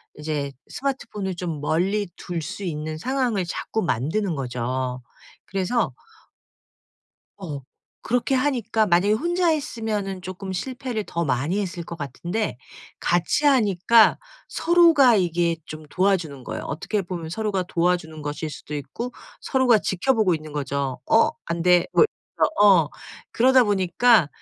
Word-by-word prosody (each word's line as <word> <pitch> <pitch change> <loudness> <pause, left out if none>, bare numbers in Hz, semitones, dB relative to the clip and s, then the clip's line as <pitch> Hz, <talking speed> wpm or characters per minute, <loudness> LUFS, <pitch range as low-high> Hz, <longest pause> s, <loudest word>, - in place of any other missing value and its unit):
이제 150 -2 -3 0.2
스마트폰을 215 -9 -3
좀 170 -4 -4
멀리 190 +7 0
둘 170 -2 -4
수 195 +6 -6
있는 155 -2 -4
상황을 240 -2 0
자꾸 220 +5 -3
만드는 170 - -1
거죠. 125 0 -3 0.4
그래서 195 - -1 1.4
어. 155 -8 -6 0.5
그렇게 245 +3 +1
하니까 240 -5 +1
만약에 190 +3 +3
혼자 345 +8 +1
했으면은 220 - -2
쪼끔 185 +1 -6
실패를 245 +1 -4
더 170 0 -2
많이 145 +7 0
했을 185 -3 -3
것 170 - -7
같은데 170 - -3 0.4
같이 175 - +1
하니까 225 -4 +5 0.3
서로가 325 -8 +5
이게 170 -2 +1
좀 155 0 -9
도와주는 170 -9 0
거예요. - - -5
어떻게 205 +6 -2
보면 175 -3 -6
서로가 205 0 -1
도와주는 170 -3 0
것일 150 +1 -4
수도 150 - -8
있고 150 - -5 0.3
서로가 255 -5 +3
지켜보고 200 -1 +1
있는 155 -1 -7
거죠. 140 -2 -2
"어 225 - +5 0.2
안돼." 170 +1 +3
뭐 450 - +7 0.3
저 - - +3 0.2
어. 170 -7 +6 0.4
그러다 260 +2 +5
보니까 200 -2 +3
185 Hz, 285 characters per minute, -23 LUFS, 155-225 Hz, 1.4 s, 뭐